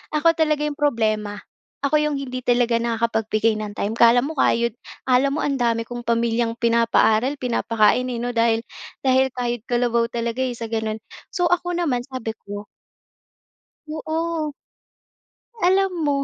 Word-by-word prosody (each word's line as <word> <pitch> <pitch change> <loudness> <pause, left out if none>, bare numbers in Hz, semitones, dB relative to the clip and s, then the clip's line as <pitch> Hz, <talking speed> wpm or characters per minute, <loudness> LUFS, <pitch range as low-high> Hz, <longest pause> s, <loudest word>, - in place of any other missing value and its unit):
ako 305 +2 +2
talaga 305 -2 +2
yung 290 -1 -5
problema. 215 -7 0 0.4
Ako 285 +2 +2
yung 300 -1 0
hindi 255 -2 -5
talaga 240 -1 +3
nakakapagbigay 225 -1 0
ng 210 -1 -5
time. 205 +2 -1
‘Kala 235 +1 +6
mo 300 +4 -5
kayod 235 -2 +2 0.3
akala 260 +2 +3
mo 305 - -1
ang 280 -1 0
dami 230 -2 0
kong 240 0 -7
pamilyang 235 0 +1
pinapaaral, 230 +1 +3
pinapakain, 235 -1 +2
eh, 245 - -3
‘no. 245 - -2
Dahil 230 -1 +2 0.4
dahil 265 -1 +2
kayod 240 -2 -2
kalabaw 240 -2 +1
talaga, 235 +1 -2
eh, 250 - -2
sa 230 -1 -6
ganun. 220 -1 -2 0.3
So, 355 -3 +1
ako 355 0 0
naman 285 -9 -1
sabi 255 -4 -5
ko 205 +1 -7 1.2
Oo. 315 0 -3 1.1
Alam 380 +1 +3
mo, 285 -2 +1
240 Hz, 150 wpm, -22 LUFS, 230-280 Hz, 1.2 s, Kala